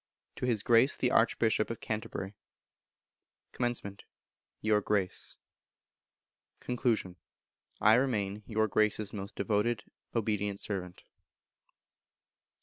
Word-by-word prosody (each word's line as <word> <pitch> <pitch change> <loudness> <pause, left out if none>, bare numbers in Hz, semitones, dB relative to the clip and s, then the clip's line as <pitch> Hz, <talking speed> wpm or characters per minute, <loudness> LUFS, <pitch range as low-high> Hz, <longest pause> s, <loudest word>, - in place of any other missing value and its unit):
To 125 - -2
His 110 -5 +1
Grace 120 +3 +5
the 125 - +1
Archbishop 110 -1 +3
of 115 - -4
Canterbury. 105 -3 -4 1.2
Comm. 120 -5 -2 0.6
Your 105 -1 +2
Grace. 100 -3 -1 1.2
Con. 115 -7 -1 0.6
I 110 - +6
remain, 105 -5 +1
Your 110 0 +1
Grace's 105 0 +1
most 100 0 -6
devoted 105 +1 0 0.3
obedient 105 -3 0
servant. 90 -4 -4
110 Hz, 90 wpm, -31 LUFS, 100-115 Hz, 1.2 s, I